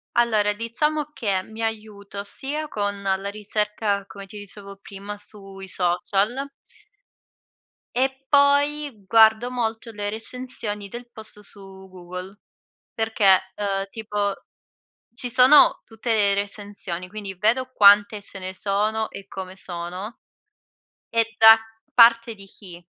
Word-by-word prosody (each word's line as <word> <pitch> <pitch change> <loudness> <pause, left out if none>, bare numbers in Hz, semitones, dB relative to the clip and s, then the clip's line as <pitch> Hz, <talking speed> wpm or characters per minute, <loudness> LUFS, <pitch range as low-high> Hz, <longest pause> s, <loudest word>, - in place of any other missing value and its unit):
Allora, 215 -3 +3
diciamo 295 +8 -1
che, 200 -9 -1
mi 220 +3 -8
aiuto 210 -2 -5
sia 290 +8 -5
con 205 -5 -3
la 195 0 -1
ricerca, 210 -1 -2
come 200 0 -11
ti 210 - -11
dicevo 200 0 -10
prima 200 +1 -9
sui 195 -2 -9
social 195 +8 0 1.5
e 265 +1 -1
poi 285 +1 +3
guardo 220 +3 +5
molto 230 -1 -3
le 205 -1 -4
recensioni 220 -2 -4
del 240 +3 -9
posto 215 -2 -10
su 200 - -13 0.3
Google. 185 +2 -9 0.5
Perché, 220 -4 +3 0.2
uhm, 195 -1 -2
tipo, 210 -2 -2 0.8
ci 245 +1 -3
sono 255 +5 +6
tutte 225 +1 -6
le 205 -2 +3
recensioni, 200 -3 -4
quindi 200 -1 -7
vedo 235 +7 +1
quante 205 -1 +6
ce 200 -1 -8
ne 185 0 -6
sono 215 +3 0
e 195 0 -10
come 190 -1 -7
sono 180 +4 -7 0.9
e 230 0 0
da 225 0 +9 0.4
parte 230 -1 +6
di 200 -2 -14
chi, 180 -3 -14
210 Hz, 125 wpm, -23 LUFS, 200-230 Hz, 1.5 s, da